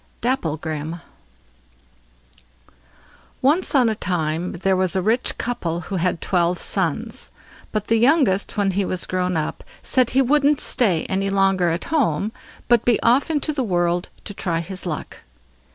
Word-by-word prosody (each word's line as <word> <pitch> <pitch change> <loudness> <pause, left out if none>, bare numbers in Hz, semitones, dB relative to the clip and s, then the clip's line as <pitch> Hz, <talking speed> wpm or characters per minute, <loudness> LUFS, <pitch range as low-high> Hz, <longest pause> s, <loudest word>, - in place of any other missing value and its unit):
DAPPLEGRIM 160 - -2 2.4
Once 305 +5 +2
on 255 -3 +5
a 220 - +1
time 175 -3 -2
there 190 +2 +1
was 185 0 +1
a - - +2
rich 225 +5 +1
couple 175 -8 -2
who 195 +1 -4
had 175 -1 0
twelve 175 -1 +1
sons; - - -2 0.4
but 215 -1 -2
the 225 - +2
youngest 240 - +2
when 200 -1 +2
he 200 +2 0
was 185 -1 -2
grown 180 -2 -1
up, 155 - -3 0.2
said 255 -3 +2
he 265 - +3
wouldn't 290 +2 +3
stay 190 -10 +1
any 195 +1 -1
longer 195 -2 +2
at 165 +2 -2
home, 215 - +1 0.4
but 235 -1 +4
be 240 -2 +3
off 250 +7 +3
into 305 0 0
the 280 - -1
world 175 -5 0
to 205 - -7
try 170 -4 -2
his 185 +2 -5
luck. 155 -4 -5
195 Hz, 150 wpm, -22 LUFS, 175-240 Hz, 2.4 s, on